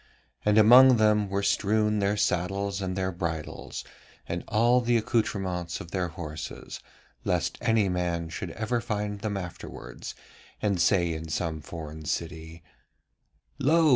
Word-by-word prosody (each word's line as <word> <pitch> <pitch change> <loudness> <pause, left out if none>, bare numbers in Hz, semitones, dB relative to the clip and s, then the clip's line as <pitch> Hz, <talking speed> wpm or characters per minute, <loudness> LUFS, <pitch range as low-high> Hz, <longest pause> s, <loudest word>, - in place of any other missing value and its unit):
And 105 0 +3
among 125 +4 +8
them 105 -2 +3
were 100 +1 -1
strewn 105 +1 +2
their 100 +1 +1
saddles 100 +2 0
and 95 -1 -2
their 95 0 -1
bridles, 85 -4 -4 0.4
and 85 +1 -3
all 120 +3 +4
the 120 0 +3
accoutrements 95 -7 -1
of 85 - -9
their 90 -2 0
horses, 80 -2 -7 0.4
lest - - 0
any 110 -3 +3
man 85 -2 -1
should 80 - -5
ever 115 +2 -2
find 105 -3 -3
them 100 -1 -2
afterwards 85 -8 -7 0.4
and 100 -4 +1
say 85 -2 +3
in 80 0 -6
some 80 0 -2
foreign 80 -1 -8
city: 80 0 -4 1.0
'Lo! 155 +3 +4
95 Hz, 140 wpm, -27 LUFS, 85-105 Hz, 1.0 s, among